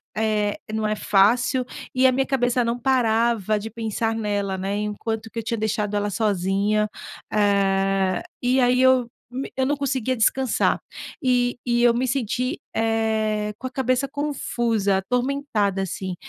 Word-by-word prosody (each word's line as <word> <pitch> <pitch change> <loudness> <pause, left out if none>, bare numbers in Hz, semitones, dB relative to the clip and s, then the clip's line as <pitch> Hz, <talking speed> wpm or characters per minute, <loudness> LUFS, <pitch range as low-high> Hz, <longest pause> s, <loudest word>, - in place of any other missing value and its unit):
eh, 215 -1 0 0.2
não 215 -1 0
é 215 - 0
fácil. 240 +6 +3 0.3
E 260 +1 +4
a - - +4
minha 270 +1 +1
cabeça 245 -2 +1
não 235 +1 -1
parava 230 -4 +2
de 220 +2 -6
pensar 225 0 -2
nela, 205 -3 -1
né. 195 +2 -2
E, - - -1
enquanto 220 +1 -4
que 230 - -5
eu - - -5
tinha 230 +1 -2
deixado 210 -1 -1
ela 205 0 -1
sozinha. 205 +1 +1 0.5
Eh. 195 -2 +2 0.2
E 255 +1 +2
aí 250 +1 +3
eu 260 -2 +4 0.2
me 260 +2 -5
eu 260 - +2
não 290 - +1
conseguia 260 -3 -1
descansar. 255 +3 +2 0.4
E 245 -2 +1
e 240 0 +2
eu 240 -1 +6
me 255 +1 0
senti, 250 0 -1 0.2
eh, 220 -1 0
com 260 - -5
a - - -5
cabeça 255 +1 0
confusa, 240 -8 -1
atormentada, 245 -3 -1
assim. 190 -1 -4
225 Hz, 160 wpm, -23 LUFS, 205-250 Hz, 0.5 s, eu